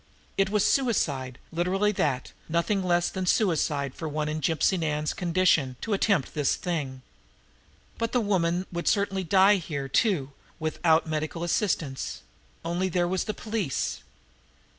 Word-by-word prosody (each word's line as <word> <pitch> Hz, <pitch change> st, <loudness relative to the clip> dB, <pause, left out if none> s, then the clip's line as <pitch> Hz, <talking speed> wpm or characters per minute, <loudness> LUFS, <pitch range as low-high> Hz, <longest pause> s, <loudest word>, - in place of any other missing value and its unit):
It 195 Hz, 0 st, +2 dB
was 210 Hz, 0 st, +2 dB
suicide, 140 Hz, -, +1 dB
literally 185 Hz, +5 st, +1 dB
that, 140 Hz, -9 st, -1 dB, 0.2 s
nothing 170 Hz, +5 st, +1 dB
less 175 Hz, -1 st, +2 dB
than 185 Hz, -1 st, -3 dB
suicide 150 Hz, -, +1 dB
for 160 Hz, -, -5 dB
one 150 Hz, 0 st, -2 dB
in 155 Hz, +1 st, -3 dB
Gypsy 165 Hz, +5 st, +2 dB
Nan's 150 Hz, -1 st, -1 dB
condition 170 Hz, -, +2 dB
to 225 Hz, -, -2 dB
attempt 195 Hz, -, +1 dB
this 150 Hz, -3 st, +1 dB
thing. 140 Hz, -7 st, -4 dB, 1.0 s
But 230 Hz, 0 st, -1 dB
the 250 Hz, -, +2 dB
woman 185 Hz, -4 st, +1 dB
would 170 Hz, -1 st, -4 dB
certainly 200 Hz, -2 st, +1 dB
die 195 Hz, +3 st, +5 dB
here, 145 Hz, -6 st, -4 dB
too, 145 Hz, -, +1 dB, 0.3 s
with 155 Hz, -1 st, -3 dB
out 160 Hz, -1 st, +4 dB
medical 155 Hz, +1 st, -3 dB
assistance 165 Hz, -, -1 dB, 0.4 s
only 175 Hz, +3 st, 0 dB
there 175 Hz, 0 st, +1 dB
was 185 Hz, +1 st, -1 dB
the 215 Hz, -, -3 dB
police! 215 Hz, -, -2 dB
170 Hz, 145 wpm, -27 LUFS, 150-195 Hz, 1.0 s, die